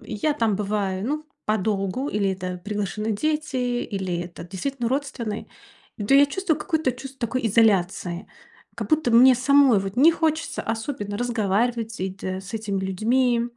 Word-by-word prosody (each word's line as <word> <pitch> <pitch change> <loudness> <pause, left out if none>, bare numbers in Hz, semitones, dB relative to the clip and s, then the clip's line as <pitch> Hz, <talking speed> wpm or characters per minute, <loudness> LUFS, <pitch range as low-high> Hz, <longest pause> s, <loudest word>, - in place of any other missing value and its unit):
я 290 +10 0
там 225 -7 +1
бываю, 200 -1 -1
ну, 300 +3 -2 0.2
подолгу- 210 +4 -1
или 200 -4 0
это 185 -1 -5
приглашены 210 +1 -2
дети, 305 +5 -1 0.3
или 190 -4 -3
это 175 -1 -9
действительно 235 +8 -3
родственные- 255 -5 -3 0.6
то - - +5
я 280 +1 +8
чувствую 335 0 -1
какое-то 315 -6 0
чувство 265 +2 -10
такой 250 +1 -1
изоляции. 190 -4 +2 0.5
Как - - -5
будто 310 -5 +2
мне 255 +3 +8
самой 270 -2 +5
вот 195 +1 -4
не 295 +6 +7
хочется 320 -1 -1
особенно 220 -2 -3
разговаривать 230 0 0
с 225 - -9
эт 190 +1 -5
с 190 +2 -4
этими 210 -3 -2
людьми. 235 +6 +1
225 Hz, 150 wpm, -24 LUFS, 195-265 Hz, 0.6 s, я